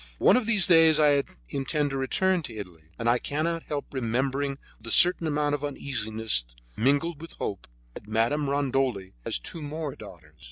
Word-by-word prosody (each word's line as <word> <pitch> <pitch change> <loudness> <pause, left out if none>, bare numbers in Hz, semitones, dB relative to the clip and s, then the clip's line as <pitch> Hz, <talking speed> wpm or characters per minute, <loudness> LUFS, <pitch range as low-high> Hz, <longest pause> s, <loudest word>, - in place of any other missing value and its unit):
One - - +5
of 245 -3 +1
these 210 -6 +3
days 165 -3 +6
I 145 -2 +4 0.3
intend 145 - -1
to - - -3
return 185 +7 +1
to 120 -7 -8
Italy, 90 -7 -9
and 115 - -3
I 120 +1 +3
cannot 165 +5 -2
help 145 -3 -4
remembering 135 +3 -1 0.2
with 115 - -12
a - - -2
certain 175 +6 +5
amount 145 -1 0
of 145 0 -2
uneasiness, 110 - 0 0.3
mingled 145 +6 +1
with 165 - -10
hope, 100 - -5 0.3
that 100 - -11
Madame 120 +7 0
Rondoli 135 -8 -1
has - - 0
two 160 - -7
more 150 -1 -5
daughters. - - -14
140 Hz, 175 wpm, -26 LUFS, 115-155 Hz, 0.3 s, days